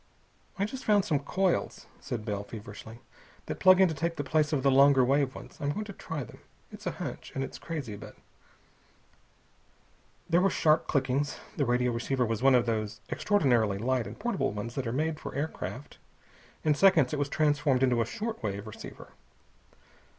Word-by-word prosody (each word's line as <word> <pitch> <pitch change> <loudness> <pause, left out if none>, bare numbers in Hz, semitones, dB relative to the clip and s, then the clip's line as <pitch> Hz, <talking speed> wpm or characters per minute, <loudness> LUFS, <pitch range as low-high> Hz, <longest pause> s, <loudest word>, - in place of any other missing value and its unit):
"I 200 - +1
just 255 +5 -6
found 205 -2 +3
some 150 -4 +1
coils," 185 +5 -1
said 110 -3 -5
Bell 100 -1 -2
feverishly, 110 +2 -10 0.4
"that - - -5
plug 185 0 +7
in 190 - +7
to 165 - -2
take 165 +3 -2
the 145 - -3
place 150 +1 +1
of 140 -4 0
the 135 - +4
longer 135 -1 +6
wave 135 0 +1
ones. - - -11
I'm 145 - 0
going 215 +6 -4
to 200 - -8
try 160 -6 -5
them. - - -13 0.3
It's - - -8
a - - 0
hunch, - - -6
and 135 - -1
it's - - -7
crazy, 145 -10 -5
but...." - - -11 2.1
There 170 +1 +3
were 195 - +4
sharp 155 -4 +2
clickings. 140 +1 0 0.2
The 140 - +1
radio 125 0 +2
receiver 125 +2 0
was 115 0 -2
one 135 0 +6
of 120 -1 +3
those 110 -2 -2
extraordinarily 120 - +2
light 125 +2 0
and - - -9
portable 145 - -1
ones 105 +3 -5
that 130 -2 -3
are - - -1
made 155 +4 -1
for - - -7
aircraft. 145 -2 -5 0.6
In 155 - +4
seconds 160 -5 +4
it 150 - -1
was 145 0 0
transformed 145 -4 +2
into 125 -3 +3
a - - +1
short 225 0 -4
wave 100 -2 -3
receiver. 110 - -10
135 Hz, 185 wpm, -29 LUFS, 120-160 Hz, 2.1 s, plug